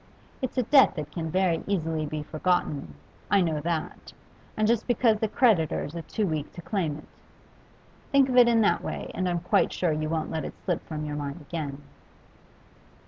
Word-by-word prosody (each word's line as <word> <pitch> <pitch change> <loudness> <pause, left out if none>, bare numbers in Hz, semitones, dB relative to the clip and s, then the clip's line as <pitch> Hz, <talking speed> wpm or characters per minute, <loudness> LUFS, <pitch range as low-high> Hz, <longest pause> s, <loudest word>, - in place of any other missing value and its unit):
It's 260 0 -3
a 255 - +3
debt 270 +4 +5
that 150 -2 -5
can 165 -1 -4
very 180 -1 +1
easily 165 -5 -1
be 150 0 -4
forgotten, 155 - -1 0.3
I 200 - +4
know 160 -4 0
that, 165 +1 -4 0.4
and 215 0 +2
just 230 -1 +1
because 230 -3 +3
the 220 - +1
creditors 175 - +2
are 170 - -3
too 215 +6 -2
weak 155 -4 -3
to 175 - -9
claim 165 -7 -1
it. 155 - -12 1.1
Think 275 -1 +5
of 255 - -1
it 245 -1 +8
in 230 -1 +4
that 210 - +3
way, - - -5
and 185 -1 -1
I'm 175 -1 -1
quite 180 - +2
sure 175 -3 0
you 155 0 -1
won't 160 -1 -2
let 160 -2 -2
it - - -6
slip 175 -4 -1
from 155 -1 -4
your 150 0 -4
mind 145 +2 -4
again. 145 -2 -5
170 Hz, 195 wpm, -27 LUFS, 155-210 Hz, 1.1 s, it